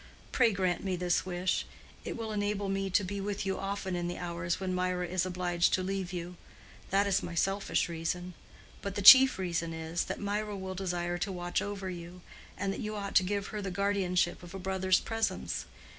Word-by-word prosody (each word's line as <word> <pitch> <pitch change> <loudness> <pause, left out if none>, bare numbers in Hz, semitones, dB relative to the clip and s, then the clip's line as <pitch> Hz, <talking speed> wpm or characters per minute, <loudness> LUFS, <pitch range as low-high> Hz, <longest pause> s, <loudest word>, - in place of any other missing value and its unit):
Pray 235 -3 +4
grant 185 -3 0
me 190 -2 -1
this 180 +1 0
wish. 180 0 0 0.4
It - - -5
will 225 -1 -4
enable 205 -1 -1
me 195 0 -1
to 190 +2 +3
be 200 +2 -4
with 205 0 -3
you 190 0 -1
often 195 -1 -3
in 175 0 -2
the 175 - -4
hours 170 0 -2
when 190 -1 -2
Mirah 180 0 0
is 185 +1 0
obliged 175 -1 +1
to 185 - -2
leave 190 -1 -2
you. 175 0 -5 0.5
That 200 +1 +3
is 200 0 +2
my 170 - -6
selfish 195 +4 +1
reason. 175 +2 -3 0.5
But 200 -1 -4
the 205 - -2
chief 265 +5 +10
reason 170 -3 -2
is, 160 +1 -2
that - - -4
Mirah 205 0 -2
will 190 0 -5
desire 175 -2 -2
to 200 - -2
watch 175 -1 -1
over 205 -2 -4
you, 175 0 -7 0.4
and 195 0 -1
that - - -6
you 215 0 -4
ought 200 -1 -4
to - - +7
give 200 +2 -2
her 210 - -3
the 195 - -3
guardianship 190 -2 +1
of 175 +1 -10
a - - -3
brother's 190 0 +2
presence. 225 0 -2
185 Hz, 205 wpm, -31 LUFS, 175-200 Hz, 0.5 s, chief